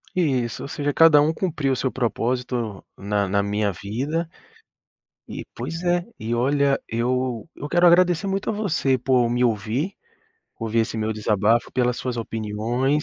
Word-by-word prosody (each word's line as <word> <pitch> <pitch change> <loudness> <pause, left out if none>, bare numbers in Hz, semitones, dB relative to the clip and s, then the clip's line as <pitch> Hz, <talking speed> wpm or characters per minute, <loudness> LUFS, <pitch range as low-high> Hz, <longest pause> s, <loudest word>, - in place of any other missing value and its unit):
Isso, 130 -10 0
ou - - -5
seja, 145 0 -2
cada 160 -3 +7
um 155 +2 +2
cumpriu 155 -6 -1
o - - +2
seu 130 - -1
propósito 120 -3 -2
na 100 0 -1
na 100 +1 +2
minha 100 0 0
vida 135 - -3 1.0
e - - -7
pois 165 +2 -5
é. 175 0 +2 0.2
E, 115 +2 -3
olha, 140 +3 +2
eu 120 0 -1
eu 145 - -7
quero 175 0 +4
agradecer 175 +1 +5
muito 195 +1 -1
a - - 0
você 160 -11 +1
por 125 -1 +2
me 120 +1 +1
ouvir, 115 - 0 0.7
ouvir 115 0 -1
esse 110 0 -2
meu 110 0 -1
desabafo, 110 +2 +1
pelas 125 -1 0
suas 125 -2 -3
opiniões, 115 +6 -1
125 Hz, 160 wpm, -23 LUFS, 110-150 Hz, 1.0 s, cada